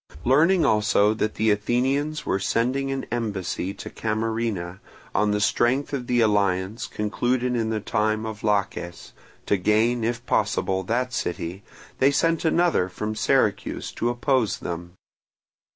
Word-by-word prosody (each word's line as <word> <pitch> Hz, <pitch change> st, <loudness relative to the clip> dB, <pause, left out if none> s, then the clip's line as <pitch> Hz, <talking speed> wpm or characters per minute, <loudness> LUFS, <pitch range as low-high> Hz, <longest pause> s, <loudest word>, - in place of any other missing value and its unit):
Learning 160 Hz, +6 st, +4 dB
also 105 Hz, -2 st, +3 dB
that 110 Hz, -1 st, -2 dB
the 110 Hz, 0 st, +2 dB
Athenians 135 Hz, +8 st, 0 dB
were 95 Hz, -, 0 dB
sending 130 Hz, +7 st, 0 dB
an 135 Hz, -1 st, -3 dB
embassy 100 Hz, -5 st, -2 dB
to -, -, -8 dB
Camarina, 110 Hz, -4 st, -2 dB, 0.3 s
on 105 Hz, +1 st, +2 dB
the 105 Hz, 0 st, +1 dB
strength 125 Hz, +7 st, +1 dB
of 125 Hz, -3 st, -3 dB
the 120 Hz, -1 st, +2 dB
alliance 100 Hz, -1 st, +1 dB
concluded 125 Hz, +4 st, -1 dB
in 115 Hz, -2 st, 0 dB
the 110 Hz, -1 st, -1 dB
time 110 Hz, +1 st, 0 dB
of 110 Hz, -1 st, -6 dB
Laches, 100 Hz, -4 st, -2 dB, 0.3 s
to 100 Hz, -, +2 dB
gain, 110 Hz, +5 st, +2 dB
if 120 Hz, +1 st, -2 dB
possible, 95 Hz, -5 st, 0 dB
that 120 Hz, +6 st, -1 dB
city, 90 Hz, -3 st, -3 dB, 0.4 s
they 135 Hz, -, +5 dB
sent 165 Hz, +3 st, +1 dB
another 165 Hz, -, +2 dB
from 105 Hz, +4 st, -4 dB
Syracuse 110 Hz, -, 0 dB
to 120 Hz, -, -1 dB
oppose 120 Hz, -3 st, +1 dB
them. 85 Hz, 0 st, -6 dB
110 Hz, 140 wpm, -24 LUFS, 105-125 Hz, 0.4 s, they